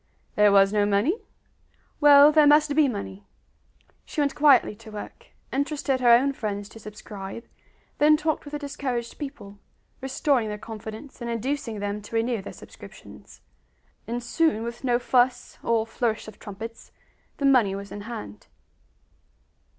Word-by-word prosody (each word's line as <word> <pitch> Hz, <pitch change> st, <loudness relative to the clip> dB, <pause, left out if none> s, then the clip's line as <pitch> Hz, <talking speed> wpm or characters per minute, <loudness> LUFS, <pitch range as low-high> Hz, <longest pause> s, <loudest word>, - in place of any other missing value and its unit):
There 210 Hz, -1 st, +4 dB
was 195 Hz, 0 st, +5 dB
no 210 Hz, -1 st, +3 dB
money? 210 Hz, -, +1 dB, 0.8 s
Well, 290 Hz, 0 st, +8 dB
there 305 Hz, -1 st, +5 dB
must 295 Hz, 0 st, +4 dB
be 305 Hz, -2 st, +5 dB
money! 100 Hz, -, -6 dB, 0.8 s
She -, -, -7 dB
went 285 Hz, -2 st, +1 dB
quietly 280 Hz, -7 st, +4 dB
to 225 Hz, 0 st, -13 dB
work, 210 Hz, -1 st, -9 dB, 0.3 s
interested 280 Hz, -1 st, -1 dB
her 245 Hz, -1 st, +3 dB
own 255 Hz, +4 st, +5 dB
friends 205 Hz, -5 st, -4 dB
to 225 Hz, -, -13 dB
subscribe, 210 Hz, 0 st, -9 dB, 0.6 s
then 305 Hz, +1 st, +5 dB
talked 315 Hz, 0 st, -1 dB
with 290 Hz, -, -11 dB
the -, -, -1 dB
discouraged 265 Hz, -5 st, -4 dB
people, 205 Hz, -9 st, -8 dB, 0.4 s
restoring 265 Hz, -2 st, 0 dB
their 210 Hz, 0 st, -4 dB
confidence 220 Hz, +5 st, -9 dB
and 235 Hz, -, -4 dB
inducing 230 Hz, -2 st, -3 dB
them 205 Hz, +1 st, -3 dB
to 210 Hz, +2 st, -9 dB
renew 225 Hz, -1 st, 0 dB
their 195 Hz, -, -8 dB
subscriptions; -, -, -14 dB, 0.7 s
and 240 Hz, +1 st, -4 dB
soon, 240 Hz, -2 st, +1 dB
with 235 Hz, +2 st, -7 dB
no 245 Hz, -2 st, +2 dB
fuss 245 Hz, 0 st, 0 dB
or 230 Hz, -1 st, +1 dB
flourish 225 Hz, -1 st, -2 dB
of 215 Hz, -, -12 dB
trumpets, 220 Hz, +3 st, -9 dB, 0.5 s
the 280 Hz, -, -2 dB
money 240 Hz, -8 st, +4 dB
was 200 Hz, 0 st, -8 dB
in 205 Hz, -, -7 dB
hand. 105 Hz, -, -8 dB
235 Hz, 150 wpm, -25 LUFS, 210-280 Hz, 0.8 s, Well